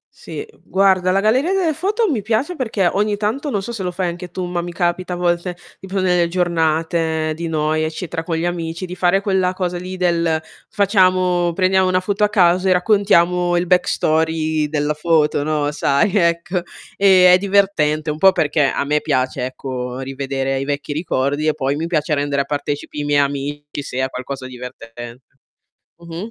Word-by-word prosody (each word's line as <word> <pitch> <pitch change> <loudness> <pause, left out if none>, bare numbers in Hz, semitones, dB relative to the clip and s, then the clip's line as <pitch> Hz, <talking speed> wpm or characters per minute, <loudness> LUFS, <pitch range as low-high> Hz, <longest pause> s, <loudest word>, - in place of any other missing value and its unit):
Sì 430 - -7 0.2
guarda, 190 -1 +2
la 195 +1 +2
galleria 260 - +2
delle 350 -5 +1
foto 410 +6 0
mi 225 -6 -1
piace, 235 - -1
perché 220 -8 -1
ogni 205 0 0
tanto, 230 +8 -2
non 200 - -1
so 235 - -5
se 210 - -5
lo 180 - -2
fai 180 -1 -2
anche 175 +1 -7
tu, 185 0 -4
ma 175 -1 -2
mi 175 0 -6
capita 180 +1 -1
a - - -2
volte 175 0 -1 0.2
di 190 - -10
prendere 185 -2 +1
le - - 0
giornate 160 -2 0
di 170 +1 -4
noi, 155 0 0
eccetera 165 +1 -4
con 165 -1 -2
gli 170 - -1
amici 170 0 -3
di 180 0 -7
fare 180 +2 +2
quella 190 -2 +1
cosa 180 -1 -2
lì 185 +1 -7
del 170 -3 +1 0.3
facciamo 185 -3 +2
prendiamo 185 +1 +2
una 185 0 +2
foto 205 +2 -1
a - - -1
caso 180 -1 +3
e - - +6
raccontiamo 180 -3 +2
il 175 - 0
backstory 160 -3 +1
della 150 0 0
foto, 150 -2 +2
no, 150 -1 0
sai, 150 +7 +1
ecco. 170 0 +1 0.4
E, 185 -2 +6
è - - +7
divertente, 175 -6 +1
un 150 - -5
po' 190 0 +7
perché 150 -2 +1
a 140 - -1
me 150 +1 +1
piace 130 -3 -1
ecco 130 -1 -5
rivedere 135 0 -3
i - - -2
vecchi 145 0 -3
ricordi, 145 -1 -1
e 155 - +3
poi 140 -1 -1
mi 165 +2 -3
piace 155 -2 0
rendere 140 -1 0
a - - -17
partecipi 145 +1 -4
i - - -3
miei 145 0 +2
amici 145 +1 -4
se 130 - -7
è 130 - -1
qualcosa 130 +1 -6
divertente. 120 -1 -10 0.7
Mh-mh. 170 +6 -7
170 Hz, 190 wpm, -19 LUFS, 150-185 Hz, 0.7 s, è